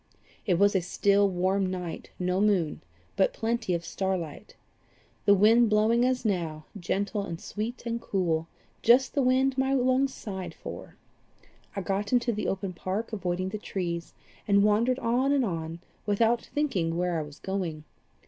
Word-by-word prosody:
"It 180 Hz, -4 st, +3 dB
was 200 Hz, +2 st, +4 dB
a 190 Hz, -, +3 dB
still, 200 Hz, +3 st, +3 dB
warm 190 Hz, +1 st, +1 dB
night, 180 Hz, -3 st, -5 dB
no 180 Hz, +1 st, 0 dB
moon, 190 Hz, -7 st, +1 dB, 0.3 s
but -, -, +2 dB
plenty 225 Hz, -5 st, -1 dB
of 170 Hz, 0 st, -4 dB
star 190 Hz, +2 st, -1 dB
light, 160 Hz, -4 st, -8 dB, 0.7 s
the 200 Hz, -, +7 dB
wind 225 Hz, +4 st, +5 dB
blowing 220 Hz, +3 st, +3 dB
as 255 Hz, -1 st, 0 dB
now, 165 Hz, -7 st, -1 dB
gentle 200 Hz, +2 st, -1 dB
and 170 Hz, -4 st, -5 dB
sweet 230 Hz, +4 st, -5 dB
and 235 Hz, 0 st, -2 dB
cool 165 Hz, -4 st, 0 dB, 0.3 s
just 250 Hz, +3 st, +5 dB
the 280 Hz, -, +2 dB
wind 260 Hz, +1 st, +2 dB
my 265 Hz, +1 st, +2 dB
lungs 260 Hz, +1 st, +2 dB
sighed 190 Hz, -8 st, -6 dB
for. -, -, -9 dB, 0.8 s
I 200 Hz, -, -2 dB
got 195 Hz, +2 st, -2 dB
into 240 Hz, -1 st, +2 dB
the 210 Hz, -, -2 dB
open 195 Hz, -1 st, -2 dB
park, 195 Hz, +6 st, -4 dB
avoiding 185 Hz, -2 st, -2 dB
the 210 Hz, +2 st, -5 dB
trees, 170 Hz, -4 st, -4 dB, 0.3 s
and 200 Hz, -1 st, +5 dB
wandered 225 Hz, +5 st, +3 dB
on 255 Hz, +2 st, +1 dB
and 275 Hz, -3 st, +3 dB
on, 165 Hz, -3 st, -4 dB, 0.3 s
without 225 Hz, +3 st, +2 dB
thinking 190 Hz, -, 0 dB
where 175 Hz, -2 st, 0 dB
I -, -, -1 dB
was 150 Hz, -1 st, -9 dB
going. 180 Hz, -6 st, -3 dB
200 Hz, 165 wpm, -28 LUFS, 180-235 Hz, 0.8 s, the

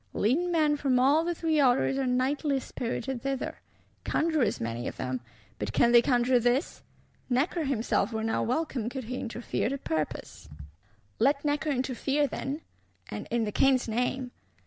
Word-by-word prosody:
Leading 320 Hz, +12 st, +1 dB
men 305 Hz, -3 st, +3 dB
from 270 Hz, -3 st, +2 dB
all 285 Hz, +5 st, +4 dB
the 345 Hz, 0 st, -1 dB
Three 320 Hz, -2 st, +1 dB
Orders 265 Hz, 0 st, +3 dB
are 265 Hz, -, 0 dB
nightly 270 Hz, +3 st, +1 dB
spirited 255 Hz, 0 st, -4 dB
thither; 270 Hz, 0 st, -3 dB, 0.4 s
conjurors 310 Hz, -8 st, +1 dB
many 115 Hz, +1 st, -3 dB
of -, -, -6 dB
them; 130 Hz, -1 st, -3 dB, 0.4 s
but 105 Hz, +1 st, -3 dB
can 235 Hz, -, +4 dB
they 240 Hz, 0 st, +8 dB
conjure 245 Hz, 0 st, +3 dB
this? 245 Hz, +4 st, 0 dB, 0.5 s
Necker 295 Hz, +6 st, +1 dB
himself 245 Hz, -2 st, 0 dB
were 220 Hz, -1 st, -2 dB
now 225 Hz, -, 0 dB
welcome, 255 Hz, -3 st, -1 dB
could 265 Hz, +1 st, -5 dB
he 250 Hz, +3 st, -4 dB
interfere 235 Hz, -1 st, -2 dB
to 275 Hz, -, -2 dB
purpose. 155 Hz, -, -4 dB, 0.7 s
Let 280 Hz, +4 st, +2 dB
Necker 295 Hz, +1 st, 0 dB
interfere, 270 Hz, +2 st, 0 dB
then; 280 Hz, +2 st, -4 dB, 0.5 s
and -, -, -5 dB
in 235 Hz, 0 st, +1 dB
the 210 Hz, -, -2 dB
King's 260 Hz, +2 st, +3 dB
name! 250 Hz, +2 st, -1 dB
255 Hz, 160 wpm, -28 LUFS, 235-290 Hz, 0.7 s, they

